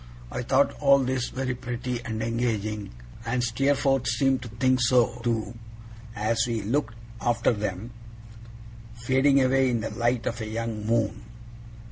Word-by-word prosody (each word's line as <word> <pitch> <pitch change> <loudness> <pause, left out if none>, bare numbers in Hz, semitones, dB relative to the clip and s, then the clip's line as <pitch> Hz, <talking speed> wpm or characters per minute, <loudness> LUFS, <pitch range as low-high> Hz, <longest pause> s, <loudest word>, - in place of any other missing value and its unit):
I - - -3
thought - - +2
all 140 - +6
this 130 -2 -1
very 130 0 -2
pretty 120 0 -4
and 110 -2 -3
engaging, 110 -3 -2 0.3
and 120 +2 -1
Steerforth 135 +2 +1
seemed 130 +3 +2
to 125 - -7
think 130 +3 +1
so 120 -1 +3
too, 115 -1 -1 0.6
as 110 +2 +1
we 115 -3 -2
looked 120 +2 -1 0.3
after 120 0 +2
them 105 +1 -4 1.0
fading 130 +3 +3
away 130 0 +3
in 120 -2 0
the 110 - -4
light 120 -1 0
of 115 0 -3
a 110 - -4
young 110 -1 -4
moon. 115 -1 0
120 Hz, 145 wpm, -26 LUFS, 115-130 Hz, 1.0 s, all